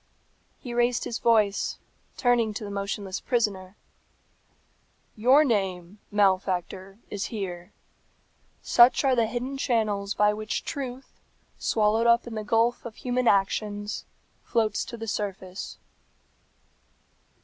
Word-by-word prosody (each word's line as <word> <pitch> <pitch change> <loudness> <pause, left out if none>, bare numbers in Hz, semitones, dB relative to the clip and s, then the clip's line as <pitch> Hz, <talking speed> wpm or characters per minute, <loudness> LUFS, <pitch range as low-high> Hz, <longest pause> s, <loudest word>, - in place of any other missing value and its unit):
He 245 - -7
raised 240 0 +1
his 230 - -4
voice, 215 -4 +2 0.4
turning 235 -4 +2
to 215 - -5
the 205 - -6
motionless 200 -1 -3
prisoner, 205 -6 -1 1.4
"Your 255 +7 +5
name, 195 -5 -1
malefactor, 190 -1 0
is 205 - -3
here. 185 -3 -5 0.9
Such 240 +4 +5
are 265 -2 +3
the 230 -2 +2
hidden 255 +4 -4
channels 210 -6 0
by 210 0 +3
which 215 0 -3
truth, 265 -1 -6 0.4
swallowed 220 +1 +2
up 235 0 +4
in 235 - -7
the 215 -1 -4
gulf 230 +3 +1
of 235 -2 -8
human 250 -1 -1
actions, 205 +1 0 0.4
floats 220 -3 0
to 235 - -8
the 225 - -6
surface." 195 -3 -5
215 Hz, 115 wpm, -26 LUFS, 200-235 Hz, 1.4 s, Your